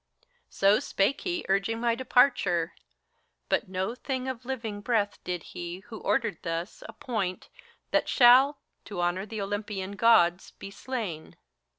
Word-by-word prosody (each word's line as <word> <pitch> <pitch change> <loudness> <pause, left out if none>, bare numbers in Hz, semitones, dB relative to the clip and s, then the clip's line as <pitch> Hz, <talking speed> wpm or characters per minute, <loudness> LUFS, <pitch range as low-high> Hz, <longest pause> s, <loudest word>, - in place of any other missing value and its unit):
So 200 +2 +3
spake 200 +8 0
he, 355 -2 -3
urging 195 +4 0
my 235 0 +2
departure; 230 - +2 0.8
but - - 0
no 190 +4 -2
thing 260 0 -4
Of 255 -2 -5
living 225 -6 -4
breath 205 -2 -1
did 180 -3 -4
he, 175 +1 -6
who 220 - -7
ordered 230 -9 0
thus, 165 +2 -4
appoint, 200 -7 -4 0.4
That - - +1
shall, 260 +3 +6 0.3
to 200 -4 -6
honor 175 +3 -1
the 215 -1 -5
Olympian 200 -1 -4
Gods, 195 -4 +3
be 195 - -9
slain. 200 -7 -5
205 Hz, 135 wpm, -28 LUFS, 185-240 Hz, 0.8 s, shall